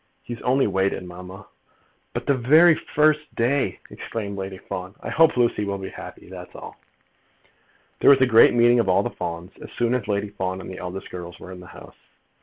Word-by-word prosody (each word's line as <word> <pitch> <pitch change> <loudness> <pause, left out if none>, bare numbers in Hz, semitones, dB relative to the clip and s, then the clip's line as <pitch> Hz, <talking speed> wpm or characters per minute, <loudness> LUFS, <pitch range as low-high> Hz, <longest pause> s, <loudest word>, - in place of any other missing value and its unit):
"He 120 - -6
has 115 - -9
only 130 +2 +2
waited, 95 -1 0
mamma." 90 +1 -10 0.7
"But - - -3
the 140 - +3
very 155 +7 +6
first 155 0 0
day!" 130 +4 0
exclaimed 100 -3 -6
Lady 95 -1 -6
Fawn. 95 +1 -7
"I - - -6
hope 160 -3 +4
Lucy 120 -3 +2
will 100 -1 -2
be 95 0 -7
happy; - - -11
that's 90 -1 -11
all." - - -10 1.2
There - - +5
was 140 - +7
a - - +7
great 115 -1 +6
meeting 120 0 +5
of 115 - +1
all 90 - +3
the - - -3
Fawns, 85 +2 -6
as - - -10
soon 120 0 0
as 125 -5 -2
Lady 100 0 -1
Fawn 95 -2 -4
and 95 - -8
the 95 - -8
eldest 90 +2 -7
girls 85 -1 -8
were 95 - -10
in 90 - -9
the 90 - -12
house. - - -14
100 Hz, 210 wpm, -23 LUFS, 95-125 Hz, 1.2 s, was